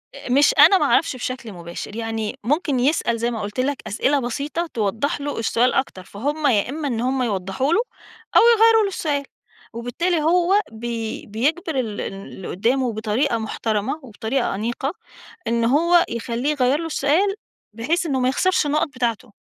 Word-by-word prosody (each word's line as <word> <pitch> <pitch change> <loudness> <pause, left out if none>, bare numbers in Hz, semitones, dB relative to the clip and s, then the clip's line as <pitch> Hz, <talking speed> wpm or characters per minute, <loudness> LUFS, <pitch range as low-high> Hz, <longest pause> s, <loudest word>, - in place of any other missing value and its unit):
آآ - - -9
مش 280 +3 +5
أنا 390 - +8
ما - - +1
أعرفش 325 - +2
بشكل 255 -2 -5
مباشر. 170 +3 -8
يعني 225 -2 -3
ممكن 285 - 0
يسأل 245 -3 +1
زي 235 +1 -1
ما 225 -2 -4
قُلت 205 +4 -5
لك 275 +2 0
أسئلة 275 +7 +1
بسيطة 285 +7 -3
توضّح 225 +7 -1
له 290 -3 -3
السؤال 235 +2 +2
أكتر، 260 -8 -2
فهُم 290 +11 -2
يا 220 -4 +2
إمّا 295 +2 -3
إن 235 -4 -2
هم 260 +1 0
يوضّحوا 205 - -1
له 430 - +4 0.5
أو - - +8
يغيّروا 450 0 +6
له - - +1
السؤال 300 -7 -2 0.5
وبالتالي 310 +9 -1
هو 355 +5 +3
بي 225 0 -5
بيجبِر 285 +8 -1
ال 220 -5 -3
ال - - -4
اللي 195 -1 -9
قُدّامه 240 +5 0
بطريقة 225 +4 0
محترمة 220 +4 -2
وبطريقة 235 0 -2
أنيقة 240 - -2 0.5
إن 230 0 +1
هو 335 +7 +4
يخلّيه 235 +4 -2
يغيّر 275 0 +2
له 330 - -4
السؤال 325 +6 +1 0.4
بحيث 290 +11 -1
إنه 275 -5 0
ما 255 0 +2
يخسرش 370 +5 +2
النُقَط 300 +2 +1
بتاعته. 240 -4 -3
255 Hz, 170 wpm, -22 LUFS, 225-300 Hz, 0.5 s, أنا